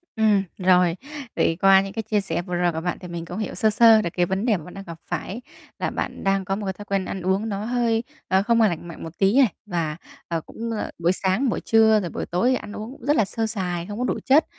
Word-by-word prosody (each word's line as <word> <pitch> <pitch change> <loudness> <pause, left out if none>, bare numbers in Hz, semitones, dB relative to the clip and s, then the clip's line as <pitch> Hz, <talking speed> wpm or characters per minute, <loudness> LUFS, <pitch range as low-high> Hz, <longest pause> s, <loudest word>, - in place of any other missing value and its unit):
Ừm, 210 -3 +3
rồi. 180 -2 +4 0.4
Vậy 165 - +1
qua 195 0 +7
những 195 0 -6
cái 225 0 -3
chia 210 -1 0
sẻ 175 -3 -2
vừa 180 -1 -4
rồi 175 0 +2
của 160 0 -4
bạn 175 0 -2
thì 180 - -9
mình 170 -1 -6
cũng - - -7
hiểu 215 - -3
sơ 220 - +3
sơ 225 0 +6
được 170 - -2
cái 175 -1 +2
vấn 190 +5 -2
đề 215 -6 +3
mà 155 - -10
bạn 180 - -11
đang 195 - -8
gặp 170 -2 -9
phải 185 +7 -4 0.4
là - - 0
bạn - - -4
đang 195 -1 +1
có 195 -1 -1
một 205 0 -5
cái 190 - -2
thói 205 +2 -11
quen 195 -2 -1
ăn 190 - -5
uống 190 +4 0
nó 200 +1 -3
hơi, 235 -1 +1 0.2
ờ, 190 +1 +3
không 230 +1 +2
có 220 - +6
lành 170 -1 -4
mạnh 170 - -9
một 165 +1 -9
tí 200 +6 +3
này 250 -10 +5
và, 165 -5 -2 0.3
ờ, 165 -2 -2
cũng 230 +6 -6
là 220 - -3
buổi 170 +1 +3
sáng, 195 +8 0
buổi - - -1
trưa, 220 -1 +5
rồi 175 -4 -4
buổi - - -4
tối 180 +9 +1
thì - - +3
ăn 210 -3 -6
uống 215 +4 -6
cũng 265 -2 -12
rất 295 +1 +3
là 215 - +3
sơ 225 +2 -2
sài, 180 -5 -3
không 205 +1 -6
có - - 0
đủ - - -1
chất. 285 +4 +5
195 Hz, 290 wpm, -23 LUFS, 175-220 Hz, 0.4 s, qua